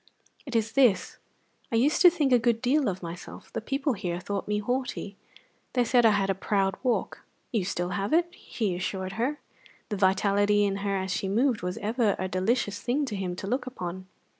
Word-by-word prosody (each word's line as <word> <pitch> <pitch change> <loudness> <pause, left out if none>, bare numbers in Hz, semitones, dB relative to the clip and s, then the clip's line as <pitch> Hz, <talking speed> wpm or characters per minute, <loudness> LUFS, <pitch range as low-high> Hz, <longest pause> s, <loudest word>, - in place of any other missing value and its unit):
"It 255 - -5
is 225 0 +1
this: 250 -8 +3 0.5
I - - 0
used 270 +7 +3
to 360 - +10
think 310 -6 0
a 245 - +6
good 230 -1 +2
deal 260 +1 +2
of 185 -1 -5
myself; 170 +1 -9
the - - -2
people 275 +4 -1
here 175 -4 -3
thought 200 +2 -4
me 210 0 0
haughty; 245 -2 -3 0.6
they 245 - +3
said 240 -1 +4
I - - +6
had 200 -2 +2
a - - +1
proud 195 0 0
walk." 250 -3 -1 0.3
"You 225 - +1
have 185 +3 -2
it 340 +2 +4
still," - - -29
he 210 - -3
assured 185 +1 -3
her; 240 +9 -1 0.5
the 210 - -2
vitality 205 +2 +3
in 195 -1 -1
her 200 0 -1
as 190 -1 -2
she 190 +1 -1
moved 235 +3 +2
was 180 +1 -3
ever 215 -1 +1
a 185 - -2
delicious 205 +3 0
thing 275 +4 0
to 225 -6 -4
him 185 -2 -3
to 185 - -6
look 255 +6 -1
upon. 185 -6 -6
205 Hz, 205 wpm, -27 LUFS, 190-245 Hz, 0.6 s, to